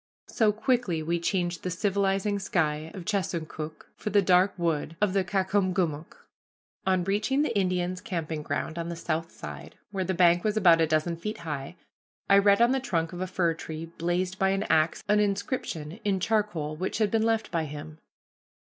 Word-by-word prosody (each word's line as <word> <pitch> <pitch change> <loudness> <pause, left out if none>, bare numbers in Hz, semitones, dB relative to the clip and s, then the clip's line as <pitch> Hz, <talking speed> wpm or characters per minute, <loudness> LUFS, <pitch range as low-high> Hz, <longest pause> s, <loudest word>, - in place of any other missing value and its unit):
So 220 -2 +3
quickly 220 - 0
we 170 +2 0
changed 175 0 -1
the 185 - -3
civilizing 195 +2 0
sky 155 -5 0
of 185 -3 -7
Chesuncook 165 -6 -3
for - - -4
the 205 0 +4
dark 185 +2 +4
wood 165 -1 -1
of 205 -3 +2
the 195 -1 +2
Caucomgomoc. 185 -5 -1 0.6
On 185 -1 +3
reaching 215 +9 +1
the 270 - -1
Indian's 185 -2 0
camping 165 -6 -3
ground 150 +3 -3
on 170 0 -3
the 170 - -4
south 165 0 -3
side, 75 -2 -9 0.2
where 195 -2 -1
the 185 +1 -1
bank 175 0 +4
was 215 0 0
about 170 -5 +6
a 160 - +3
dozen 155 +2 0
feet 210 +6 -4
high, 145 0 -4 0.5
I 200 0 +7
read 200 +3 +5
on 240 - +4
the 265 - +2
trunk 170 -10 -1
of 175 - -6
a 185 - -1
fir 180 -2 +1
tree 160 0 -6
blazed 180 +3 -1
by 195 - +3
an 195 +1 0
axe 155 +1 +2
an 210 0 +4
inscription 200 - -2
in 195 -2 +1
charcoal 185 -7 0
which 185 +4 -3
had 215 -2 +1
been 225 - +2
left 225 0 +1
by 165 -2 0
him. 155 +1 -8
180 Hz, 185 wpm, -27 LUFS, 165-200 Hz, 0.6 s, I